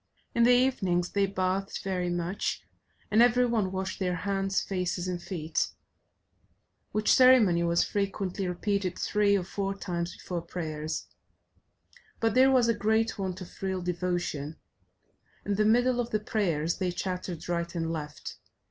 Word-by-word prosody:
In 235 - +1
the 245 - +6
evenings 195 -9 +2
they 200 -1 +2
bathed 190 +1 -2
very 180 -2 -1
much, 175 +2 -2 0.5
and 215 +2 +5
every 245 +1 +5
one 220 -6 0
washed 190 0 -3
their 180 -2 0
hands, 195 +2 0
faces, 180 -1 -2
and 180 -1 -3
feet, 160 -4 -2 1.2
which 215 0 +3
ceremony 245 -10 +6
was 170 0 +2
frequently 195 -1 -2
repeated 185 0 -1
three 205 -1 +2
or 185 - -2
four 195 +1 -3
times 175 -3 -4
before 175 -2 -4
prayers; 155 -2 -4 1.1
but 225 -2 +1
there 260 +1 +6
was 255 -3 +4
a 230 - +4
great 220 +1 +1
want 190 -1 -3
of 180 - -11
real 190 -2 -2
devotion: 175 -4 -2 0.9
in 205 - 0
the 210 +2 +2
middle 245 +3 +3
of 240 -1 -1
the 215 - 0
prayers 170 -7 -1
they 185 -2 0
chattered 180 -2 -4
right 170 0 -2
and 165 -1 -1
left. 150 -2 -6
190 Hz, 150 wpm, -28 LUFS, 175-210 Hz, 1.2 s, the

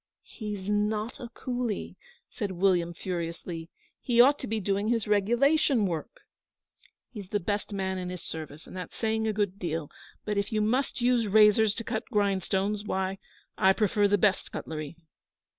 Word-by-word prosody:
'He's 210 -4 -6
not 210 +2 0
a 245 -3 -7
coolie,' 245 -3 -3 0.3
said 205 -4 -4
William 175 -2 +2
furiously. 170 -1 -5 0.3
'He 240 -2 0
ought 280 +4 +7
to - - -5
be 220 +1 -1
doing 200 +1 0
his 230 -2 +1
regulation 240 +4 +3
work.' 170 +4 -4 0.9
'He's 205 -6 -8
the 205 - 0
best 205 +4 -2
man 190 -1 -2
in 180 0 -4
his 180 -2 -6
service, 155 -1 -7
and - - -11
that's 180 -1 -7
saying 220 0 0
a - - +2
good 200 -2 -1
deal; 165 -3 -3 0.3
but 210 -1 0
if 200 +1 -2
you 215 - +1
must 245 +5 0
use 240 -2 +3
razors 210 +1 +5
to 230 - -4
cut 220 - -3
grindstones, 200 -1 0
why, 190 -2 -2 0.4
I 190 0 +6
prefer 210 0 +2
the 205 0 +3
best 200 -1 +1
cutlery.' 155 0 -5
205 Hz, 165 wpm, -28 LUFS, 185-220 Hz, 0.9 s, ought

